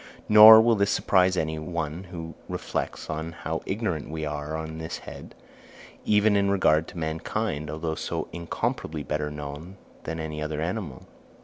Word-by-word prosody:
Nor 110 +1 +10
will 115 +1 +4
this 100 -2 +1
surprise 95 -2 +2
any 80 -1 -1
one 85 +1 -4
who 85 -3 -8 0.2
reflects - - -4
how 80 0 -4
ignorant 95 -8 -2
we 80 0 -4
are 75 +1 -4
on 80 0 -6
this 80 +1 -5
head, - - -11 0.7
even 105 0 +3
in 100 0 +2
regard 80 -5 +3
to 90 - -11
mankind, 80 0 -3
although 80 +1 -3
so - - -4
incomparably 80 -2 -3
better 75 +1 -2
known 75 +5 -8 0.3
than 80 +1 -4
any 75 -1 -5
other 75 0 -3
animal. 85 - -4
80 Hz, 150 wpm, -26 LUFS, 75-95 Hz, 0.7 s, Nor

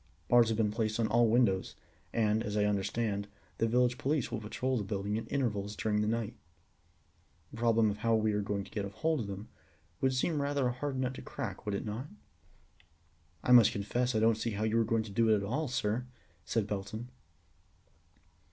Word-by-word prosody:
Bars 120 -1 +6
have 110 -1 0
been 110 -2 +2
placed 110 0 -1
on 115 - +3
all 120 +1 +4
windows, 110 -5 +2 0.4
and, 110 -1 +2
as 105 -2 -3
I 105 - +3
understand, 100 0 -1 0.3
the 115 - +3
village 125 +1 +2
police 140 -2 0
will 110 - -2
patrol 130 +5 -2
the 110 - -1
building 100 +1 -2
at 115 - -5
intervals 105 -7 -1
during 105 -1 0
the 105 - 0
night. 115 0 -1 1.2
The - - -10
problem 115 -2 +3
of 100 - -5
how 115 +1 +2
we 110 -1 +2
are 105 - +1
to 100 0 -2
get 105 +1 -4
hold 155 +11 -1
of 110 - -3
them 100 +2 -7 0.5
would 130 -1 +1
seem 150 +3 +1
rather 140 -1 0
a 125 - +2
hard 135 +1 -3
nut 130 0 -1
to - - -8
crack, - - -6
would 105 - 0
it - - -3
not?" 110 +6 -4 1.4
"I - - +1
must 115 -2 +8
confess 120 +4 -1
I - - +3
don't 110 0 +3
see 115 - -1
how 105 - -1
you 110 +1 +2
are - - +4
going 115 0 +1
to 110 - -9
do 115 +3 +2
it 110 - +6
at 100 - -1
all, 135 +10 -1
sir," 120 0 -1 0.4
said 115 -3 0
Belton. 105 +4 -5
110 Hz, 205 wpm, -32 LUFS, 105-125 Hz, 1.4 s, must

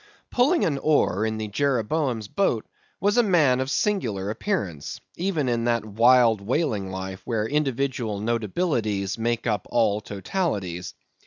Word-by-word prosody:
Pulling 290 +8 +3
an 140 -4 0
oar 120 -9 +2
in 110 0 -2
the 110 0 -3
Jeroboam's 125 0 0
boat, 120 - 0 0.3
was 205 +3 +2
a - - +7
man 160 - +3
of 130 - -1
a - - -5
singular 115 - 0
appearance, 100 - -3 0.2
even 165 -6 -1
in 120 -1 0
that 115 -2 +1
wild 115 0 +4
whaling 105 - -1
life 95 0 -6
where 110 -3 -1
individual 130 -6 -1
notabilities 110 - -1
make 115 0 -1
up 105 -5 -1
all 110 -3 +2
totalities. 100 - -3
115 Hz, 145 wpm, -25 LUFS, 105-150 Hz, 0.3 s, a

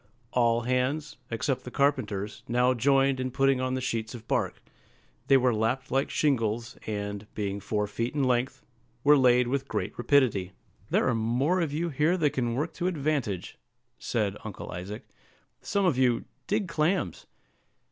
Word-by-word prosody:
All 120 -1 +3
hands, 130 +5 -1
except 125 +3 -1
the - - -7
carpenters, 125 -8 0
now 125 +2 +3
joined 135 +2 +3
in 130 0 -1
putting 135 0 +2
on 130 0 -1
the 130 - -2
sheets 115 -1 -3
of 115 -1 -11
bark; - - 0 0.7
they 135 - +7
were 125 -1 +3
lapped 115 +4 -1
like 135 +2 +1
shingles, 120 -4 0
and, 100 -1 -4
being 100 -1 -2
four 105 +1 -1
feet 115 +6 -3
in 145 - +1
length, 125 0 0 0.4
were 150 +1 +7
laid 125 -2 +4
with 135 +2 -1
great - - -3
rapidity. 110 -10 +2 0.4
"There - - +2
are 125 - +3
more 125 +11 +1
of 160 -4 -1
you 165 +4 -1
here 155 +5 +2
than 150 -5 +2
can 120 -2 -1
work 150 +6 -2
to 180 - -2
advantage," 145 - -2 0.4
said 105 -3 -1
Uncle 110 -3 -7
Isaac; 95 +4 -7 0.5
"some 200 -1 0
of 145 -8 +2
you, 125 -3 +2 0.2
dig 205 -1 0
clams." 160 - -1
125 Hz, 165 wpm, -28 LUFS, 115-140 Hz, 0.7 s, they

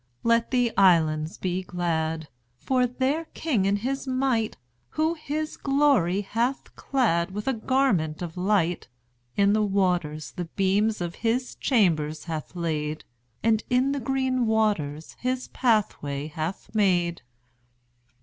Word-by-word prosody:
Let 230 0 +3
the 245 -3 +1
islands 160 -4 +3
be 185 0 -2
glad! 160 -3 -2 0.3
For 250 - +1
their 265 +6 -1
King 250 -12 0
in 200 +1 +2
his 265 +6 -3
might, 255 -4 0 0.4
Who 315 +2 +2
his 310 -1 -4
glory 270 - +2
hath 235 +6 -2
clad 195 -11 +1
With 210 +4 -6
a 265 - +2
garment 220 - +1
of 165 -2 -6
light, 180 -2 +1 0.5
In 200 0 +4
the 215 - +3
waters 180 -8 0
the 175 +7 -5
beams 195 +4 +1
of 175 -1 -4
his 240 +3 0
chambers 160 - +1
hath 160 0 -6
laid, 155 -3 -2 0.4
And 220 -1 +2
in 255 +2 +2
the 280 - -1
green 260 -1 0
waters 200 -9 0
his 255 0 -2
pathway 190 - 0
hath 160 +7 -5
made. 175 -5 +2
205 Hz, 130 wpm, -26 LUFS, 170-255 Hz, 0.5 s, In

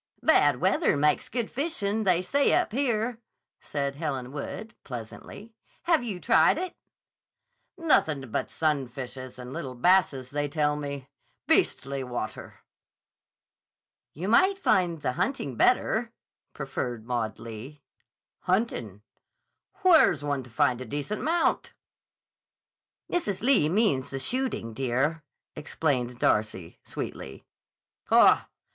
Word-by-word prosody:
"Bad - - +5
weather - - +2
makes 150 +1 +2
good 235 -1 -2
fishing, 220 -8 -1
they 180 -1 +3
say 280 +8 +2
up - - +1
here," 235 -2 0 0.4
said 140 -1 -3
Helen 135 -5 -3
Wood, 185 +9 -6
pleasantly. 125 - -9 0.3
"Have 330 -6 +3
you 205 -7 -4
tried 230 +9 +4
it?" 360 0 -4 1.0
"Nothin' 155 - +1
but - - -2
sunfishes 130 -4 -3
and 125 0 -8
little 130 -1 -5
basses, 140 -4 +2
they 145 0 -1
tell 150 0 +1
me. 140 -2 -5 0.4
Beastly 135 0 +1
water!" 125 -1 -6 1.5
"You 175 +7 -4
might 375 - +4
find 175 - +1
the 125 - +1
hunting 145 - -2
better," - - +2 0.4
proffered 120 -3 -4
Maud 120 -3 -2
Lee. 115 +6 -9 0.6
"Huntin'? 180 - -1 0.8
Where's 320 - +5
one 145 -2 -1
to 125 - -13
find 120 +2 +1
a - - -5
decent 145 - -4
mount?" 335 +2 0 1.4
"Mrs. 270 - -1
Lee 240 - +4
means 185 - +1
the 135 - -4
shooting, 245 - -2
dear," 135 +6 0 0.3
explained 135 -5 -2
Darcy, 105 -7 0
sweetly. 65 - -7 0.6
"Haw! - - +5
145 Hz, 115 wpm, -27 LUFS, 130-215 Hz, 1.5 s, Bad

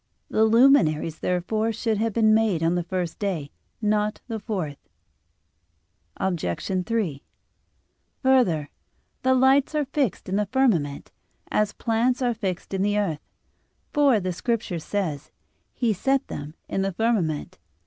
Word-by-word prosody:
The 220 - +4
luminaries, 215 - +4
therefore, 215 +5 0
should 225 -1 -1
have 225 +1 +1
been 220 0 +4
made 215 -7 +2
on 165 +1 +2
the 175 - +1
first 175 -1 -3
day, 175 -9 -2 0.3
not 210 0 +1
on - - -44
the - - -3
fourth. 180 -10 -5 1.3
Obj. 180 - -2
3: 200 -12 -1 1.0
Further, 195 - +3 0.5
the 260 0 +3
lights 265 +3 +4
are 300 -1 +1
fixed 270 -4 -1
in 190 +2 0
the 210 -1 0
firmament, 190 - +1 0.4
as 210 -1 +1
plants 240 +3 +1
are 245 -1 +2
fixed 195 -5 -4
in 190 - 0
the 205 +1 +1
earth. 165 -8 -1 0.7
For, 280 -6 +4
the 185 -1 -2
Scripture 215 -2 -2
says: 160 -5 -3 0.4
"He 235 -3 0
set 270 +7 0
them 145 +2 -6
in 195 - -1
the 195 0 -1
firmament." 185 - -1
205 Hz, 140 wpm, -25 LUFS, 175-230 Hz, 1.3 s, The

